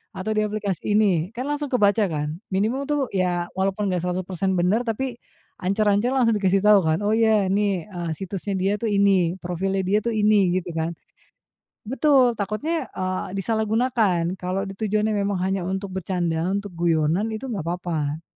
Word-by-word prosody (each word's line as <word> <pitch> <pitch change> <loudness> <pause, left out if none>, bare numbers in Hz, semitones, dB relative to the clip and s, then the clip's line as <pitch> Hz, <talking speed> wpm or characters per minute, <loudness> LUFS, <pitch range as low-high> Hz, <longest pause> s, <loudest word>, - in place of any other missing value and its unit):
"atau 190 +3 -3
di 215 - +1
aplikasi 210 -2 -2
ini." 185 -6 +2
Kan 255 - -3
langsung 290 -1 -2
kebaca 215 -3 +3
kan. 150 +1 -3
Minimum 225 +9 0
tuh, 295 -1 +1
ya, 180 -2 0
walaupun 195 +1 -1
nggak 180 - 0
100% 185 +1 -2
benar 180 +6 +2
tapi 240 +2 -3 0.4
ancer-ancer 205 +4 +2
langsung 240 -4 +3
dikasih 195 -2 +2
tahu 210 -1 +7
kan? 160 -2 +1
"oh, 210 - +2
ya 220 -2 +3
nih," 195 -3 0
eee, 175 -5 -5
"situsnya 195 +1 -4
dia 190 +2 +1
tuh 225 - 0
ini, 195 -4 +3
profilnya 190 +2 -2
dia 205 +3 +2
tuh 235 +1 -2
ini." 210 -4 +3
Gitu 175 -1 -4
kan? 165 +1 -2 0.9
Betul. 265 +1 +3
Takutnya, 215 - -2
eee, 185 0 -2
disalahgunakan. 215 -4 0
Kalau 185 +1 -2
di 195 - -5
tujuannya 215 0 0
memang 200 -1 0
hanya 190 -1 -1
untuk 190 +1 -3
bercanda, 175 -3 -1
untuk 200 +1 -2
guyonan, 170 +4 +1
itu 230 +5 -5
nggak 210 - -3
apa-apa. 165 -3 -3
195 Hz, 165 wpm, -23 LUFS, 180-215 Hz, 0.9 s, tahu